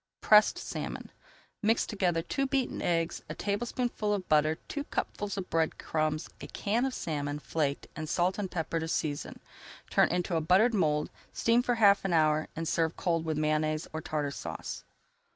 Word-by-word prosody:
PRESSED 210 0 +6
SALMON - - -5 0.5
Mix 225 +2 +3
together 180 -6 0
two 275 +9 -1
beaten 270 -2 -1
eggs, 165 -1 0
a - - -4
tablespoonful 215 +1 -1
of 190 -2 -5
butter, 155 +1 +3
two 285 - -3
cupfuls 205 -7 -3
of 185 -2 -3
bread 160 -1 +1
crumbs, 155 -1 -1
a - - -6
can 225 +5 0
of 265 - -2
salmon, 145 -2 -2
flaked, 150 -2 -2
and 155 0 -5
salt 180 +3 +1
and 195 -2 -2
pepper 165 -1 -2
to 160 - -3
[Page - - -6
303] - - +3
season, 145 - -7 0.5
turn - - +4
into 175 0 -1
a 160 - +2
buttered 190 +9 +4
mould, 150 -7 +1 0.2
steam 230 +1 +3
for 245 -1 +1
half 200 -3 +5
an 195 -2 0
hour, 155 -1 +3
and 165 0 -3
serve 165 0 0
cold 165 -3 0
with 160 -2 -1
Mayonnaise 155 0 0
or 160 - -3
Tartar 150 -2 -2
Sauce. - - -6
165 Hz, 185 wpm, -30 LUFS, 155-205 Hz, 0.5 s, PRESSED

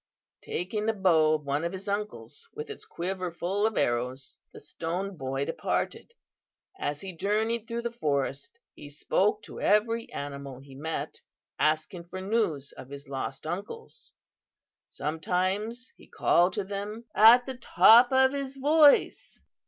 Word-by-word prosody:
"Taking 210 +5 -3
the 225 - +2
bow 165 -6 +3
of 150 - -5
one 140 +2 -1
of 170 +2 -2
his 190 +2 -8
uncles, 200 - -5
with 150 - -6
its - - -9
quiver 185 +1 -3
full 190 +5 0
of 220 - -4
arrows, 125 +3 -1 0.2
the - - -12
Stone 175 +6 -4
Boy 135 -2 -3
departed. 165 - -3 0.7
As 145 0 -3
he 190 -1 -7
journeyed 220 +5 -1
through 235 0 -4
the 235 - -2
forest 140 - -2 0.2
he 145 - -11
spoke 205 +8 0
to - - -9
every 225 +2 +1
animal 140 -2 -6
he 135 +1 -14
met, 155 +4 -5 0.4
asking 155 +3 0
for 185 +2 -7
news 190 -9 -1
of 130 - -12
his 140 +1 -10
lost 135 0 -5
uncles. 210 - -7 0.7
Sometimes 185 - -2
he - - -18
called 175 +2 +2
to 205 - -2
them 205 +4 -6
at 235 +3 +7
the 265 -2 -6
top 240 0 +6
of 265 0 +4
his 275 -1 -4
voice. 295 +1 +4
185 Hz, 150 wpm, -28 LUFS, 150-220 Hz, 0.7 s, at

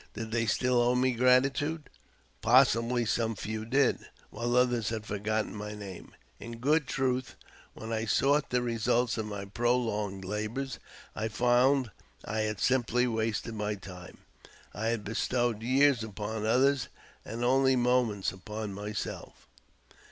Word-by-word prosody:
Did 110 0 -5
they 115 0 0
still 125 +2 +2
owe 120 +1 +2
me 130 +1 +2
gratitude? 135 +5 +2 0.5
Possibly 120 0 +4
some 115 +1 0
few 110 +3 -5
did, 135 +2 +2 0.3
while 120 +2 -2
others 125 -4 +2
had 110 -1 -4
forgotten 105 +1 -2
my 105 0 -6
name. 100 -3 -10 0.2
In 115 0 -8
good 145 +4 +2
truth, 130 -1 -1 0.4
when 110 +1 -6
I 110 0 -1
sought 140 +6 +2
the 125 0 +1
results 120 +1 0
of 110 - -3
my 100 -1 -5
prolonged 105 -3 -1
labours, 110 +7 -4 0.4
I 110 - -2
found 125 +2 +2 0.3
had 110 -1 -2
simply 125 -1 +2
wasted 115 -1 -2
my 105 -1 -2
time. 90 -2 -11 0.6
I 110 +2 -3
had 115 -2 -1
bestowed 115 +1 -1
years 130 0 +3
upon 110 +1 -4
others, 130 +3 +3 0.4
and 115 +2 -5
only 130 +1 +4
moments 120 -5 +1
upon 105 +2 -6
myself. 105 +1 -6
115 Hz, 135 wpm, -29 LUFS, 105-125 Hz, 0.6 s, Possibly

